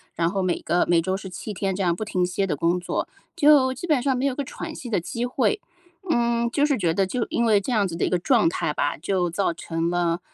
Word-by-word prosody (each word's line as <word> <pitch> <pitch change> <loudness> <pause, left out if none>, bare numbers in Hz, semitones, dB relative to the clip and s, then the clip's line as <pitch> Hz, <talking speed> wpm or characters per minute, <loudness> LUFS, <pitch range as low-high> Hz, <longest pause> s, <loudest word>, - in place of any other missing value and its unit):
然 165 0 +1
后 195 0 -1
每 180 -2 0
个 175 - +1
每 170 -1 +4
周 185 +3 -1
是 190 -1 -7
7 205 +4 -6
天 195 0 -2
这 195 - -1
样 170 -1 +2
不 215 - -4
停 180 -3 0
歇 185 +2 -1
地 150 - -1
工 170 +4 +1
作， 175 - -3 0.3
就 285 -3 +5
基 275 +7 -7
本 295 -6 +3
上 265 -1 +1
没 265 - -1
有 275 - +1
个 285 - -2
喘 - - -7
息 245 - -7
的 205 - +1
机 235 +8 -3
会。 270 +12 0 0.5
嗯， 235 -3 +1
就 290 +4 +2
是 285 -4 +1
觉 165 -3 +1
得 195 - +2
就 230 +5 -2
因 235 - +1
为 210 -3 +4
这 255 - -4
样 205 -4 +2
子 165 - -6
的 - - -2
一 - - 0
个 180 - +2
状 215 -1 +3
态 150 - -2
吧， 145 - -1
就 180 +2 0
造 170 0 0
成 165 0 -3
了 175 0 0
195 Hz, 285 characters per minute, -24 LUFS, 175-245 Hz, 0.5 s, 就